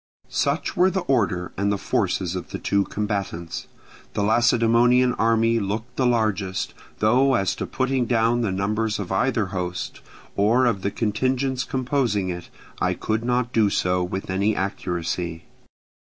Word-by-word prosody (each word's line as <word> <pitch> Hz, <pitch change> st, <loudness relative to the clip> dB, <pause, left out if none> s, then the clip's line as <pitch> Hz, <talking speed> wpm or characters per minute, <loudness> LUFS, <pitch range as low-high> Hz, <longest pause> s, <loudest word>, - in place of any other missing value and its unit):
Such -, -, -1 dB
were 185 Hz, 0 st, +4 dB
the 190 Hz, 0 st, -1 dB
order 100 Hz, -, 0 dB
and 100 Hz, +1 st, +1 dB
the 100 Hz, -, 0 dB
forces 95 Hz, -2 st, -1 dB
of 90 Hz, -, -5 dB
the -, -, -4 dB
two 100 Hz, -1 st, +1 dB
combatants. 100 Hz, -5 st, -3 dB, 0.5 s
The 100 Hz, -, +1 dB
Lacedaemonian 120 Hz, +3 st, +4 dB
army 115 Hz, 0 st, +2 dB
looked 110 Hz, +4 st, -4 dB
the 130 Hz, -, +2 dB
largest; 105 Hz, -5 st, 0 dB, 0.2 s
though 130 Hz, +5 st, +3 dB
as 100 Hz, -4 st, +1 dB
to -, -, -3 dB
putting 130 Hz, -2 st, 0 dB
down 115 Hz, 0 st, +2 dB
the 110 Hz, -5 st, 0 dB
numbers 105 Hz, +3 st, -1 dB
of 100 Hz, -3 st, -5 dB
either 110 Hz, 0 st, +1 dB
host, 90 Hz, -1 st, -4 dB, 0.3 s
or 115 Hz, +6 st, +3 dB
of 115 Hz, -6 st, +1 dB
the 100 Hz, -, 0 dB
contingents 130 Hz, +5 st, 0 dB
composing 125 Hz, -7 st, 0 dB
it, 90 Hz, -1 st, -6 dB, 0.3 s
I -, -, +1 dB
could 110 Hz, +1 st, -2 dB
not 125 Hz, 0 st, 0 dB
do 110 Hz, -3 st, +4 dB
so 90 Hz, -1 st, +1 dB
with 95 Hz, +1 st, -4 dB
any 100 Hz, +3 st, +1 dB
accuracy. 85 Hz, -3 st, -3 dB
110 Hz, 155 wpm, -23 LUFS, 95-120 Hz, 0.5 s, were